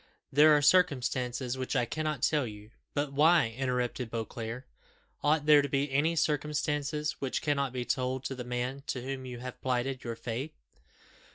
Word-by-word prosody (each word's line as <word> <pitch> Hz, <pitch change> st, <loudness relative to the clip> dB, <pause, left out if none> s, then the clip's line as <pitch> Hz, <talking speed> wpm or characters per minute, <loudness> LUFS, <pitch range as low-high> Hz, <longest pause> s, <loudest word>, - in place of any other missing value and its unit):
There 150 Hz, +2 st, +7 dB
are 145 Hz, -, 0 dB
circumstances 130 Hz, -6 st, +2 dB
which 130 Hz, +2 st, -3 dB
I 125 Hz, -2 st, +2 dB
cannot 155 Hz, 0 st, -3 dB
tell 150 Hz, -5 st, +2 dB
you." 105 Hz, 0 st, -11 dB, 0.2 s
"But 145 Hz, -1 st, -1 dB
why?" 155 Hz, -2 st, +5 dB
interrupted 125 Hz, -2 st, -1 dB
Beauclerc. 115 Hz, +2 st, -5 dB, 0.6 s
"Ought 150 Hz, 0 st, +2 dB
there 150 Hz, -1 st, +7 dB
to 140 Hz, -, -3 dB
be 140 Hz, +1 st, 0 dB
any 155 Hz, +5 st, +2 dB
circumstances 150 Hz, -1 st, -1 dB
which 135 Hz, -2 st, -2 dB
cannot 140 Hz, -3 st, 0 dB
be 125 Hz, -1 st, -3 dB
told 130 Hz, +1 st, -1 dB
to 135 Hz, -, -3 dB
the 125 Hz, -1 st, -6 dB
man 125 Hz, +2 st, -3 dB
to 125 Hz, -, -3 dB
whom 130 Hz, 0 st, -5 dB
you 125 Hz, -1 st, -6 dB
have 125 Hz, 0 st, -8 dB
plighted 130 Hz, +1 st, -1 dB
your 115 Hz, -1 st, -4 dB
faith? 120 Hz, +6 st, -5 dB
135 Hz, 170 wpm, -30 LUFS, 125-150 Hz, 0.6 s, There